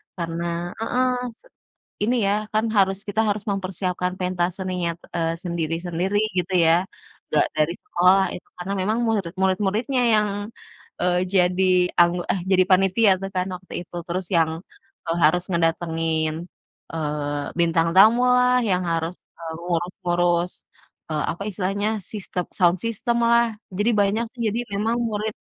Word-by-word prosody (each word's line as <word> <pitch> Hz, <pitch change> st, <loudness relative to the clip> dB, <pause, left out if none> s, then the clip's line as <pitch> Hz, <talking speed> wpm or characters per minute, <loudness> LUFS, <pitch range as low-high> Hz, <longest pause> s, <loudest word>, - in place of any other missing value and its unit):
Karena 170 Hz, 0 st, -3 dB
heeh, 250 Hz, +3 st, +1 dB, 0.2 s
se 235 Hz, -, -23 dB, 0.6 s
ini 240 Hz, +4 st, +2 dB
ya, 200 Hz, -, +2 dB, 0.2 s
kan 215 Hz, +1 st, +2 dB
harus 195 Hz, -1 st, +3 dB
kita 205 Hz, +2 st, +1 dB
harus 205 Hz, 0 st, -1 dB
mempersiapkan 185 Hz, -2 st, -2 dB
pentas 180 Hz, -1 st, -1 dB
seninya 185 Hz, -2 st, -2 dB
t -, -, -50 dB
eee, 165 Hz, -1 st, 0 dB
sendiri-sendiri, 170 Hz, +2 st, -2 dB, 0.2 s
gitu 185 Hz, +2 st, -8 dB
ya. 165 Hz, -, +6 dB, 0.6 s
Nggak -, -, +3 dB
dari 155 Hz, +2 st, +2 dB
sekolah, 180 Hz, +2 st, +4 dB
itu, -, -, -9 dB
karena 180 Hz, +2 st, -4 dB
memang 215 Hz, +4 st, 0 dB
muirid 200 Hz, -7 st, -1 dB
murid-muridnya 205 Hz, +7 st, +1 dB
yang, 210 Hz, -1 st, +3 dB, 0.7 s
eee, 180 Hz, 0 st, +2 dB
jadi 180 Hz, 0 st, +3 dB, 0.4 s
anggo 175 Hz, +1 st, +3 dB
eh, 190 Hz, -, -3 dB
jadi 185 Hz, -1 st, +5 dB
panitia 195 Hz, +3 st, +4 dB
tuh, 195 Hz, -, -4 dB
kan, 185 Hz, 0 st, +1 dB
waktu 185 Hz, +1 st, -12 dB
itu. 175 Hz, -, -13 dB
Terus 180 Hz, +1 st, -2 dB
yang, 160 Hz, -1 st, +3 dB, 0.6 s
eee, 165 Hz, -, 0 dB
harus 175 Hz, +4 st, +4 dB
ngedatengin, 165 Hz, -2 st, 0 dB, 0.6 s
eee, 150 Hz, -2 st, -2 dB, 0.2 s
bintang 165 Hz, -1 st, +3 dB
tamulah, 250 Hz, +4 st, +6 dB
yang 180 Hz, -1 st, +1 dB
harus, 165 Hz, +1 st, -1 dB, 0.3 s
eee, 165 Hz, -1 st, -6 dB
ngurus-ngurus, 175 Hz, 0 st, 0 dB, 0.6 s
eee, 155 Hz, -1 st, -1 dB
apa 170 Hz, -, -13 dB
istilahnya, 200 Hz, +2 st, -1 dB, 0.2 s
sistem 185 Hz, -4 st, -4 dB
sound 175 Hz, 0 st, +4 dB
system 230 Hz, +1 st, -1 dB
lah, 235 Hz, 0 st, +5 dB, 0.3 s
jadi 210 Hz, +4 st, +2 dB
banyak, 205 Hz, +4 st, +1 dB
sih. -, -, -5 dB
Jadi 235 Hz, -, -1 dB
memang 220 Hz, +4 st, 0 dB
murid 215 Hz, 0 st, -2 dB
180 Hz, 145 wpm, -23 LUFS, 170-205 Hz, 0.7 s, ya